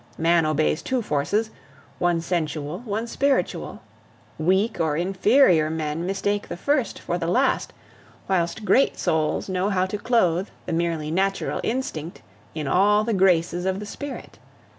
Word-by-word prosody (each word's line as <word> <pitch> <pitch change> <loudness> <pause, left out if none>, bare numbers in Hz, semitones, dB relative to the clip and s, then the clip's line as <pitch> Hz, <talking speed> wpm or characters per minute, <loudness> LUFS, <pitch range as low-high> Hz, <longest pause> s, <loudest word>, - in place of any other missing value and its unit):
Man 165 0 +3
obeys 155 +1 +1
two 260 -2 -1
forces 205 +9 0 0.5
one 175 -1 +1
sensual, 160 -1 -2
one 220 +1 -2
spiritual. 275 +3 -1 0.6
Weak 190 +7 +1
or 155 -3 +1
inferior 185 - +3
men 160 +1 -3
mistake 205 +1 -1
the - - -6
first 280 +4 0
for 175 - -3
the 165 - -2
last, 255 +10 +1 0.6
whilst 185 +2 -1
great 270 +5 +3
souls 155 -1 0
know 185 +1 0
how 185 -2 +1
to 200 +2 -4
clothe 195 -6 +2 0.2
the - - -3
merely 165 -2 -1
natural 195 +3 0
instinct 180 - -4 0.3
in 155 -3 -3
all 205 +7 +4
the 225 +1 -1
graces 180 -2 +2
of 190 0 -1
the 210 - -6
spirit. 285 +7 -8
185 Hz, 145 wpm, -24 LUFS, 165-210 Hz, 0.6 s, all